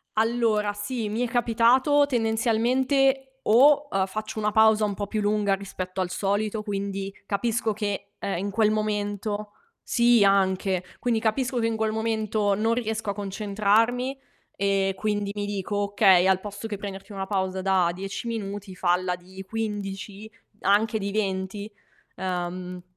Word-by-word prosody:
Allora, 220 -2 +1
sì, 210 +2 -3
mi 225 +4 -1
è - - -2
capitato 245 +4 +4
tendenzialmente, 260 +3 +1
o, 285 +6 +5
uhm, 195 -5 0
faccio 215 +3 -5
una 210 0 +1
pausa 220 0 +5
un 205 -1 -1
po' 205 +1 -4
più 215 +1 -2
lunga 205 -1 +2
rispetto 190 -1 -5
al 180 -1 -1
solito, 205 +3 -1
quindi 195 -1 -4
capisco 220 +2 0
che, 205 -1 -4
ehm, 195 -3 -2
in 200 +3 -2
quel 215 +1 +2
momento 210 0 -2 0.3
sì 235 -3 +4
anche, 190 -1 +2
quindi 235 -2 0
capisco 245 +3 0
che 225 - +1
in 225 - -1
quel 220 0 0
momento 220 -2 0
non 225 +3 +1
riesco 220 -3 -2
a - - -3
concentrarmi 215 +6 0 0.4
e 195 -1 +1
quindi 205 0 -1
mi 205 - -2
dico: 205 0 -3
"Okay, 200 -3 +4
al 190 -1 +3
posto 205 +2 -7
che 215 -2 -4
prenderti 195 +1 -8
una 195 -1 -4
pausa 190 -1 -1
da 185 -2 +3
10 195 +5 -5
minuti 205 -3 -5
falla 180 0 +1
di 185 +2 -10
15, 205 -1 -5 0.3
anche 220 +3 +3
di 200 -1 -3
20." 200 0 -2 0.5
Ehm, 180 0 -4
205 Hz, 150 wpm, -25 LUFS, 195-225 Hz, 0.5 s, o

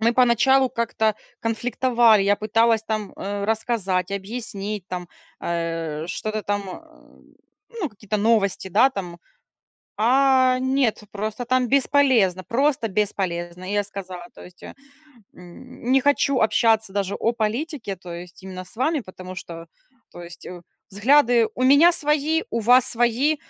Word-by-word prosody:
мы 230 +2 +3
поначалу 255 +2 +4
как-то 225 -2 0 0.3
конфликтовали, 235 -1 +2
я 200 +1 +3
пыталась 225 +1 +2
там, 215 -2 -4
э, 200 0 -4
рассказать, 205 -4 -1
объяснить, 200 -1 -5
там, 180 -2 -6 0.3
э, 165 -2 -3
что-то 215 +4 -4
там, 205 0 -2
э, 185 - -14 0.6
ну, 335 - -1
какие-то 210 0 -5
новости, 205 -3 +1
да, 210 +8 +4
там. 180 -7 -7 0.8
А 255 +2 +3
нет, 260 -4 0
просто 215 +4 -4
там 255 +1 +1
бесполезно, 255 -9 +2
просто 265 - 0
бесполезно. 185 -3 -3
И 205 - -3
я 205 - +1
сказала, 185 -2 -7
то - - -12
есть, 180 0 -16
м, - - -10 1.2
не 270 - +5
хочу 280 -1 +2
общаться 220 -1 +2
даже 200 -1 -2
о 230 - 0
политике, 230 0 -3
то 175 -1 -10
есть 175 +2 -10
именно 185 -1 -7
с - - -13
вами, 295 +4 0
потому 185 -2 -10
что, 170 -2 -9 0.4
то 175 - -10
есть 170 0 -12 0.4
взгляды 235 +2 +3
у 255 - -1
меня 285 +6 +6
свои, 305 0 +1
у 230 - -1
вас 245 +3 +5
свои, 240 +6 +2
220 Hz, 140 wpm, -22 LUFS, 190-255 Hz, 1.2 s, меня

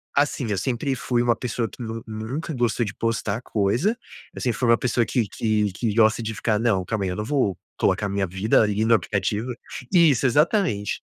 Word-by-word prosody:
assim, 140 -3 +1
eu 100 - 0
sempre 130 +4 -1
fui 120 0 0
uma 120 -1 +2
pessoa 120 -1 -2
que 125 - -12
nu 115 0 -5
nunca 115 +9 -5
gostou 120 -1 0
de 105 - -5
postar 115 -1 -1
coisa, 120 - 0 0.4
eu - - -8
sempre 120 -3 0
fui 125 - +1
uma 115 - +6
pessoa 120 -2 +1
que 120 -5 0
que 105 -2 0
que 110 +1 -1
gosta 110 +1 +3
de 110 0 -3
ficar 105 0 0
não, 105 -6 +1
calma 105 +1 -2
aí, - - -1
eu 90 - -3
não 105 - -3
vou 115 - 0 0.2
colocar 105 - +1
a - - -2
minha 100 0 0
vida 95 +6 +2
ali 105 0 +1
no 115 - +4
aplicativo. 105 +4 -1 0.4
Isso 155 -7 +5
exatamente. 130 - +1
115 Hz, 210 wpm, -24 LUFS, 105-125 Hz, 0.4 s, uma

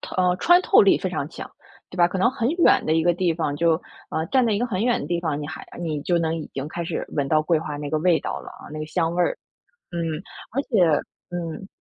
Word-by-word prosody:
它 - - -8
呃， 180 -1 +3
穿 350 - +5
透 - - +6
力 - - +5
非 - - -2
常 - - -3
强， - - -9 0.4
对 180 - -10
吧？ 175 -1 +5
可 175 - -4
能 215 +6 +3
很 250 -2 -1
远 340 +2 +4
的 155 - +2
一 160 - +3
个 175 +1 +4
地 175 -1 0
方 150 -3 -2
就 165 +1 +2 0.3
呃， 160 - -1
站 260 -3 +3
在 225 - +2
一 200 - +1
个 245 - 0
很 215 -2 -1
远 245 -1 +2
的 - - -5
地 170 +1 -1
方， 155 -3 -2
你 145 - -5
还 160 0 -8
你 155 -4 -2
就 175 - +1
能 165 0 0
已 - - -8
经 135 +2 -4
开 170 +2 -4
始 - - -3
闻 140 -2 -1
到 155 0 +3
桂 165 0 +2
花 150 -2 -5
那 145 -1 -5
个 155 - +1
味 170 0 +3
道 - - -3
了， - - -10
呃， - - -11
那 155 - -5
个 155 - -4
香 165 +1 -1
味 180 - +2
儿。 - - 0 0.6
嗯， 170 - -3 0.5
而 275 - 0
且 230 -7 0 0.5
嗯。 175 +1 -5
170 Hz, 295 characters per minute, -24 LUFS, 155-185 Hz, 0.6 s, 透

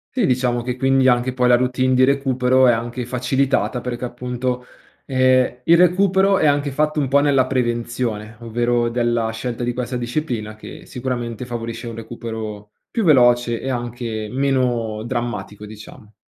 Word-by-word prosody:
Sì, 245 -7 +2
diciamo 125 -1 +1
che 125 +1 -4
quindi 135 0 +3
anche 125 0 +2
poi 125 -1 +2
la 125 - +6
routine 130 +1 +1
di 130 - +4
recupero 130 -1 +3
è 120 - +6
anche 120 +2 -3
facilitata, 125 +1 0
perché 125 0 -4
appunto, 125 +1 -3 0.4
ehm, 130 -1 +2
il 170 - +5
recupero 190 +2 +4
è - - +1
anche 145 -1 +2
fatto 150 +2 0
un 140 - 0
po' 135 +2 +3
nella 140 -3 +3
prevenzione, 120 -3 -2
ovvero 120 +1 0
della 120 -1 0
scelta 120 +2 -4
di 120 0 -1
questa 125 0 -3
disciplina 120 -4 -3
che 110 - -11
sicuramente 125 -2 -4
favorisce 115 0 -5
un 115 - -6
recupero 110 -2 -7 0.2
più 230 - -1
veloce 120 - +4
e 135 - -3
anche 120 -3 -4
meno 125 -5 0
drammatico, 120 -3 -4
diciamo. 105 0 -13
125 Hz, 160 wpm, -20 LUFS, 120-130 Hz, 0.4 s, la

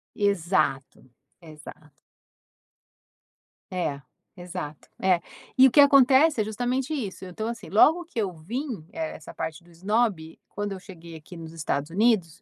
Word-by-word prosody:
Exato, 170 -9 0 0.4
exato. 155 -1 -13 1.8
É, 150 -6 -2 0.4
exato, 175 -4 -7
é. 185 -2 +3 0.4
E 265 +1 +9
o - - 0
que 290 - +4
acontece 280 +1 +6
é 215 - +3
justamente 250 +6 -2
isso, 205 -9 -5
então 185 +5 -5
assim, 235 - -7
logo 320 - +4
que 325 - -14
eu 200 -4 0
vim, 215 - -5
essa 160 -1 -6
parte 160 +1 -5
do 175 - -21
esnobe, 185 -2 -1
quando 205 0 -4
eu 190 - -5
cheguei 170 -4 -12
aqui 160 +3 -12
nos 165 -1 -9
Estados 150 -2 -3
Unidos, 190 -3 +1
185 Hz, 140 wpm, -26 LUFS, 160-235 Hz, 1.8 s, E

